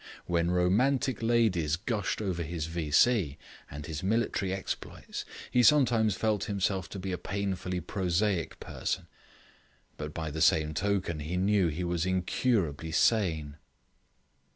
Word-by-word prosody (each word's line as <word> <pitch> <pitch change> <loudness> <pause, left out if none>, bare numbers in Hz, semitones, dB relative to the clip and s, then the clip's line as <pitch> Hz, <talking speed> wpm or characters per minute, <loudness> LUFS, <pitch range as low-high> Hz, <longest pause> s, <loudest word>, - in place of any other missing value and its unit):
When 85 0 +1
romantic 115 +8 +2
ladies 110 -10 +2
gushed 110 +2 -2
over 90 -4 -2
his 80 -1 -3
V.C. 80 - +2 0.3
and 75 +1 -7
his 80 -1 -5
military 100 -1 0
exploits, 95 0 -5 0.3
he 125 - +4
sometimes 115 -6 +4
felt 105 -2 0
himself 95 -4 -1
to - - -7
be 95 0 -4
a 90 - -3
painfully 95 -2 -3
prosaic 90 +1 -1
person, - - -3 0.9
but 75 0 -5
by 80 -1 -4
the 80 +2 -4
same 80 0 +4
token 95 -4 -1
he 80 +5 -3
knew 95 -1 +3
he 85 +3 -3
was 85 0 -1
incurably 90 - 0
sane. 80 -7 +1
95 Hz, 130 wpm, -29 LUFS, 80-105 Hz, 0.9 s, he